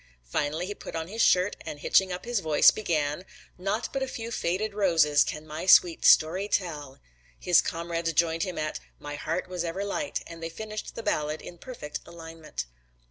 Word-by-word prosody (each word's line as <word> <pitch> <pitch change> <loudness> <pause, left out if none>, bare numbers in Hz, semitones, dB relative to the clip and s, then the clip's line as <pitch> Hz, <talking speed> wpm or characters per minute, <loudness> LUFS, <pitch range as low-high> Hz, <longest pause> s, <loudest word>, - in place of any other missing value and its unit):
Finally 145 - -1
he 205 - -4
put - - -9
on 160 0 -3
his 225 +3 -2
shirt 185 +3 +4
and 150 -2 -7
hitching 190 +4 +3
up 180 +3 -5
his 240 -2 0
voice, 155 -4 +6
began, 155 -5 -1 0.4
"Naught 200 +5 -1
but 270 - -1
a 265 - 0
few 230 -2 -6
faded 205 +1 -1
roses 165 -8 +4
can 150 0 -5
my 155 +4 -6
sweet 175 -2 +6
story 180 +6 +5
tell." 150 -9 -2 0.4
His 180 -2 +5
comrades 165 0 -2
joined 165 +1 +2
him 185 0 -2
at 155 0 -2 0.2
"My 145 - -7
heart 165 +5 -3
was 180 -1 -3
ever 175 +4 -3
light," 290 +9 -2
and 165 0 -10
they 165 - -4
finished 215 +5 -7
the 230 - -6
ballad 150 -3 -1
in 175 - -11
perfect 165 -13 -7
alignment. 165 - -7
170 Hz, 190 wpm, -27 LUFS, 155-195 Hz, 0.4 s, voice